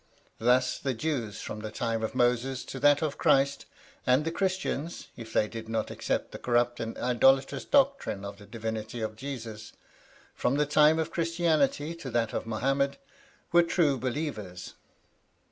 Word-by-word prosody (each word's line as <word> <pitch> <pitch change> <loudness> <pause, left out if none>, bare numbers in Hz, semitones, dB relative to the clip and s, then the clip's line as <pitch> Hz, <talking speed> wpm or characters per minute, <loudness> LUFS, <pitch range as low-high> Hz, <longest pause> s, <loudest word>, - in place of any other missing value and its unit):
Thus 125 +2 +3
the 135 -2 -2
Jews 120 -6 -2
from 105 - -6
the 110 0 -5
time 115 0 -2
of 110 - -3
Moses 125 +1 +1
to 135 - -6
that 145 +2 +5
of 150 -2 -2
Christ, 140 +1 +3 0.4
and 130 +4 +3
the 165 - 0
Christians 185 -3 -2
(if 115 -2 -9
they 105 - +2
did 110 0 -8
not 110 -1 -1
accept - - -2
the - - -8
corrupt 120 0 +1
and 115 0 -4
idolatrous 135 +2 +3
doctrine 275 - +2
of 100 +1 -7
the 105 - -13
divinity 110 0 -4
of 110 0 -3
Jesus) 115 -4 -7 0.6
from 130 - 0
the 150 +1 +2
time 150 +2 +5
of 160 - -1
Christianity 165 -3 +1
to 165 -5 -7
that 115 -2 0
of - - -3
Mohammed, 135 +5 0 0.5
were 175 - +7
true 165 -5 +2
believers. 120 - -4
130 Hz, 160 wpm, -29 LUFS, 115-150 Hz, 0.6 s, were